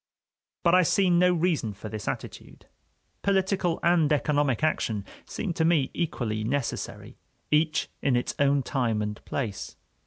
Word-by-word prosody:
But 170 -1 +4
I 185 - +7
see 185 +2 +3
no 180 +1 +5
reason 165 - 0
for 105 +2 -8
this 105 -1 -6
attitude; - - -6 0.6
political 190 -3 +1
and 170 -3 +3
economic 145 -2 +1
action 110 -9 0 0.2
seem 200 -6 -3
to 160 - 0
me 160 -5 +2
equally 115 -10 -2
necessary, 130 +2 -3 0.3
each 155 +1 +2
in 135 -3 +2
its 120 - -1
own 140 -1 +3
time 115 -5 0
and 105 0 -5
place. 110 -8 -4
145 Hz, 145 wpm, -27 LUFS, 120-175 Hz, 0.6 s, I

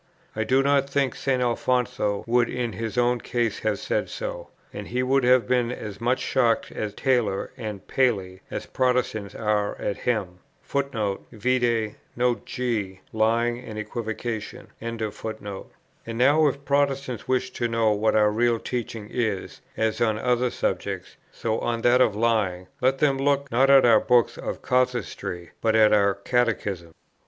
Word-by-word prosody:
I 110 - 0
do 130 +4 +3
not 140 0 +2
think 140 -2 +1
St. 130 -2 0
Alfonso 125 -3 0
would 120 0 +2
in 120 -3 -2
his 115 +4 -4
own 120 -1 +2
case 120 -3 -1
have 110 -2 0
said - - -2
so; - - -5 0.3
and - - -6
he 125 +1 -1
would 135 +1 +2
have 125 -3 +4
been 125 -1 +1
as 105 -4 -7
much 125 +2 +2
shocked 120 -3 +1
at 105 -2 -5
Taylor 120 -7 +1
and 105 -3 -7
Paley, 100 -8 0
as - - -5
Protestants 125 -5 0
are 105 -2 0
at 100 - -2
him. 100 -8 -2 0.2
Vide 115 -2 -1 0.2
Note 120 0 0
G, 110 -7 -2
Lying 115 +2 +1
and 110 -4 -8
Equivocation. 110 +1 -5
And 115 0 -4 1.1
now, 135 +7 +4
if 140 0 -3
Protestants 140 -3 0
wish 130 0 0
to 120 - -1
know 115 -1 +2
what 105 +1 +1
our 105 -1 +4
real 120 +2 +2
teaching 115 -3 -5
is, 110 -6 -2 0.2
as 110 0 0
on 110 -2 +2
other 125 +2 +1
subjects, - - -3 0.2
so 110 -1 -2
on 115 -1 -2
that 125 +1 +5
of 110 -5 +3
lying, 105 -5 +1 0.2
let 130 +1 +3
them 135 -2 +2
look, 140 0 +1
not 130 +4 +4
at 135 -2 +7
our 115 -3 +6
books 120 +1 +3
of - - -6
casuistry, 120 -9 -1
but 110 -1 +2
at 110 -1 +6
our 100 -2 +4
catechisms. 105 -9 -1
120 Hz, 155 wpm, -25 LUFS, 110-125 Hz, 1.1 s, at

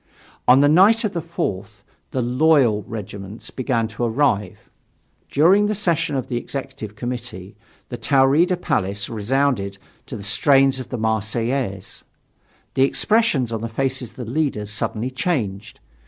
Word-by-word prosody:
On 130 +2 +7
the 145 - +5
night 195 +9 +5
of 215 - -1
the 170 - -2
4th 155 - -5 0.3
the 130 - -2
"loyal" 125 -3 +3
regiments 100 -2 -7
began 120 -3 -1
to 110 +2 -5
arrive. 115 -5 0 0.6
During 190 +8 +4
the 215 - -1
session 170 -7 0
of 130 - -2
the 120 - -2
Executive 130 -5 -6
Committee 120 -6 -6 0.3
the - - -5
Taurida 145 +7 +3
Palace 100 - -1
resounded 110 -3 0 0.3
to 120 - -6
the 100 - -9
strains 135 +5 +3
of 130 - -8
the 125 - -4
Marseillaise. 110 -1 -2 0.7
The - - 0
expression 185 - +2
on 115 -1 -3
the 115 - -3
faces 130 0 -2
of - - -23
the 125 -3 -6
leaders 115 -5 -2
suddenly 115 +3 -3
changed. 110 - -3
125 Hz, 145 wpm, -21 LUFS, 110-145 Hz, 0.7 s, On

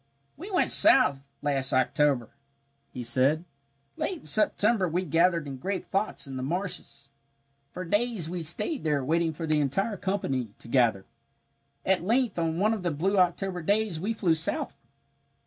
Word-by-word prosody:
"We 360 +8 -10
went 370 - 0
south 140 - +5 0.2
last 135 -2 0
October," 130 -1 +1 0.6
he 125 - -7
said. 135 +7 +1 0.5
"Late 360 -5 -4
in - - -20
September 210 -2 +4
we 180 +3 -2
gathered 170 0 +1
in 135 -2 -7
great 190 +8 -4
flocks 200 +2 -2
in 135 -1 -7
the - - -5
marshes. 155 -3 -5 0.6
"For 185 - -7
days 205 -1 -1
we 175 +1 -5
stayed 175 - 0
there 145 -4 -1
waiting 165 +3 0
for 160 +1 -6
the 155 -1 +1
entire 195 - -2
company 135 - -3
to - - -11
gather. 115 -6 +1 0.8
At 190 -2 +1
length 230 -1 0
on 165 -1 -1
one 210 +4 +1
of 215 - -4
the 180 - -1
blue 185 +6 -1
October 180 0 0
days 205 -1 0
we 200 +7 -3
flew 190 -7 +1
southward. 160 0 +1
170 Hz, 165 wpm, -26 LUFS, 140-200 Hz, 0.8 s, south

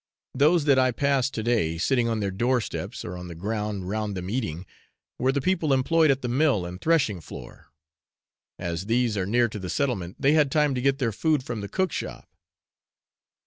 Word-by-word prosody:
Those 150 +4 +3
that 140 -3 +5
I 130 0 +4
passed 135 +1 0
to 110 - -2
day, 105 -9 +1
sitting 120 +7 +1
on 110 -2 -1
their 100 -1 -1
doorsteps, 120 +4 -2
or 90 - -5
on 90 0 -7
the 85 - -8
ground 105 +1 -3
round 105 0 -2
them 90 +2 -5
eating, 95 -8 -3 0.5
were 130 +1 +2
the 140 +1 -1
people 165 -2 +1
employed 155 +4 +3
at 135 -1 +1
the - - -1
mill 125 - +2
and 90 +2 -8
threshing 135 - +2
floor. - - -11 0.9
As 85 +2 -4
these 120 -1 +1
are 95 -2 -1
near 120 +3 +3
to 105 -2 -7
the 95 -1 -6
settlement, 100 -11 -1
they 140 - +3
had 150 -3 +4
time 150 0 +2
to 125 - -2
get 135 +1 +2
their 125 -5 0
food 150 +5 +1
from 120 -4 -5
the 100 - -6
cook 190 -3 0
shop. - - -6
120 Hz, 200 wpm, -25 LUFS, 100-140 Hz, 0.9 s, that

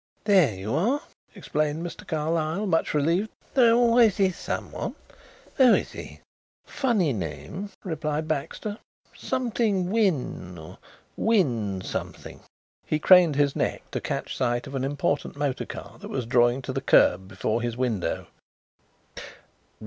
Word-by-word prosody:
"There 185 - +4
you 95 +4 -4
are," 245 - +1 0.3
explained 155 +2 -2
Mr. 195 +4 -8
Carlyle, 160 +3 -1
much 165 -5 +1
relieved. 170 +8 +1 0.2
"There 240 -4 +5
always 235 -3 +4
is 190 -3 +2
someone. - - -4 0.6
Who 260 -4 +7
is - - -2
he?" - - -10 0.4
"Funny 220 - +1
name," 90 - -5
replied 155 -3 -2
Baxter. 160 - -3 0.4
"Something 225 -7 -1
Wynn 160 - 0
or 80 -1 -11 0.4
Wynn 120 - +1
something." - - -6 0.4
He 155 - 0
craned 175 -1 +6
his 140 -1 +2
neck - - -2
to - - -3
catch - - -3
sight 120 -1 0
of 140 - -9
an 135 -1 -2
important 145 +1 -1
motor 145 -2 -2
car - - -9
that - - -9
was 130 -3 -3
drawing 120 +2 +3
to - - -4
the - - -2
kerb 95 - +4
before 105 +4 -2
his 120 0 -3
window. 120 -7 -1
155 Hz, 135 wpm, -26 LUFS, 125-200 Hz, 0.6 s, Who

